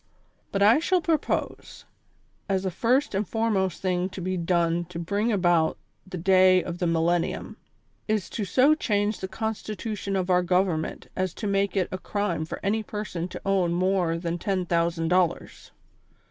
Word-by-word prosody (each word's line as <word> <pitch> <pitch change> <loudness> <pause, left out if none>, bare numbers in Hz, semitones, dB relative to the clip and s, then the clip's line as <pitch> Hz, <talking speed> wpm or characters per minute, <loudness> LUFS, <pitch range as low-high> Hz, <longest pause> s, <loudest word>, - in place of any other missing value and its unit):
But 200 0 +1
I 225 +7 +6
shall 365 +3 +2
propose, 325 -2 -2 0.6
as 190 -1 +1
the 190 - -1
first 250 - +1
and 195 0 -1
foremost 210 -6 0
thing 185 0 0
to 190 - -8
be 185 +1 -2
done 170 -1 +1
to 170 0 -9
bring 200 +7 -1
about 175 -5 +2 0.3
the 185 -1 -6
day 185 +1 +5
of 175 0 -6
the 175 - 0
Millennium, 165 +1 0 0.5
is 215 -4 0
to 215 - -3
so 260 +9 +4
change 210 -7 0
the 190 - -4
Constitution 215 0 -4
of 185 -1 0
our 180 0 +4
Government 180 -3 0
as 185 -2 -2
to - - -6
make 200 0 0
it 185 - +2
a 185 - -4
crime 180 -6 -2
for - - -6
any 215 +3 +1
person 210 -5 -5
to - - -8
own 190 -3 +2
more 180 -2 +1
than 170 0 -3
ten 190 -1 -1
thousand 170 -1 0
dollars. 180 -1 0
185 Hz, 170 wpm, -26 LUFS, 175-205 Hz, 0.6 s, I